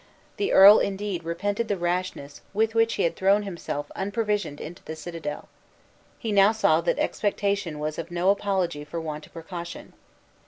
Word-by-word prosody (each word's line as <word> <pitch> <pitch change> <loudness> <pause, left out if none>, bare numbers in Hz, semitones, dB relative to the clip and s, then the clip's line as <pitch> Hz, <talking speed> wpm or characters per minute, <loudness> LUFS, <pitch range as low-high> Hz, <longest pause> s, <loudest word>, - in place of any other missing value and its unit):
The 405 0 0
earl 200 +2 +9
indeed 195 -3 -2
repented 200 +7 -2
the 205 - -1
rashness 175 -5 -3
with 220 +1 +2
which 225 0 +2
he - - 0
had 170 - +1
thrown 200 +2 +3
himself 165 -6 -5
unprovisioned 205 -5 -2
into 170 +3 -9
the 160 - -6
citadel. 160 -2 -6 0.7
He 225 - -4
now 200 +1 +5
saw 165 -7 +3
that 170 - 0
expectation 200 -5 -1
was 155 +1 -3
no 175 +2 +2
apology 190 -7 -1
for 150 +3 -5
want 155 -2 -6
of - - -26
precaution. 170 +1 -8
185 Hz, 160 wpm, -25 LUFS, 165-205 Hz, 0.7 s, earl